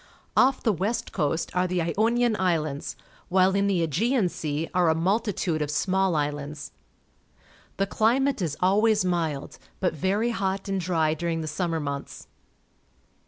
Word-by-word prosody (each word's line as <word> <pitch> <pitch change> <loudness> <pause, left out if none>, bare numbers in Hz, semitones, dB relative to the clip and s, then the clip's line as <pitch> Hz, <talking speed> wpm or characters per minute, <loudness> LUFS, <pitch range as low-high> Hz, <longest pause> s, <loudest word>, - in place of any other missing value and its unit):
Off 260 +1 +4
the 220 - +3
west 210 +6 -2
coast 160 -1 -1
are 180 0 +2
the 180 0 -1
Ionian 225 +7 +1
Islands, 155 -6 -1 0.3
while 185 +1 +4
in 200 0 +2
the 185 -4 +1
Aegean 205 - +1
Sea 155 0 -3
are 180 -2 +3
a 160 - +3
multitude 185 -2 0
of 150 - -1
small 190 +3 +1
islands. 145 0 -3 1.1
The 195 - +2
climate 245 +5 +1
is 155 -4 -2
always 205 +2 +3
mild, 165 -6 -2 0.2
but 180 - +1
very 200 +9 0
hot 195 -3 -2
and 195 -1 -1
dry 165 -3 +1
diu'ing 165 0 -2
the 155 - -4
summer 165 +1 -1
months. 140 -2 -5
180 Hz, 150 wpm, -26 LUFS, 160-200 Hz, 1.1 s, Off